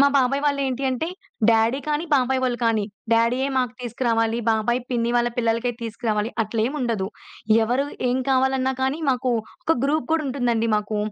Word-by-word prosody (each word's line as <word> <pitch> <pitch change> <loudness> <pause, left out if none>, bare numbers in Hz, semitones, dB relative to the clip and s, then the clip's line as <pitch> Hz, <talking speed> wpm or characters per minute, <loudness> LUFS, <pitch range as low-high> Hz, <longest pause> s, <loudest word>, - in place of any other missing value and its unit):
మా 280 - +7
బాబాయి 275 +2 +2
వాళ్ళు 285 -1 +1
ఏంటి 260 +1 -3
అంటే 260 +5 -1 0.4
డ్యాడీ 225 +3 +3
కానీ, 300 +2 0
బాబాయి 260 0 +2
వాళ్ళు 245 -2 0
కానీ, 220 -2 +2 0.3
డ్యాడీయే 235 +4 +2
మాకు 250 -3 +1
తీసుకురావాలి, 230 -1 0
బాబాయ్ 225 +2 +1
పిన్ని 235 -1 0
వాళ్ళ 240 0 +2
పిల్లలకే 230 +1 +1
తీసుకురావాలి, 225 -1 -2
అట్లేమి 225 +5 -1
ఉండదు. 225 -6 -1 0.6
ఎవరు 250 +5 +1 0.2
ఏం 250 +1 +1
కావాలన్నా 265 0 +2
కానీ 265 +3 0
మాకు 255 0 0 0.3
ఒక 325 - +2
గ్రూప్ 305 +3 +1
కూడా 325 -1 +2
ఉంటుందండి 240 -4 0
మాకు. 210 0 -2
245 Hz, 160 wpm, -23 LUFS, 230-265 Hz, 0.6 s, మా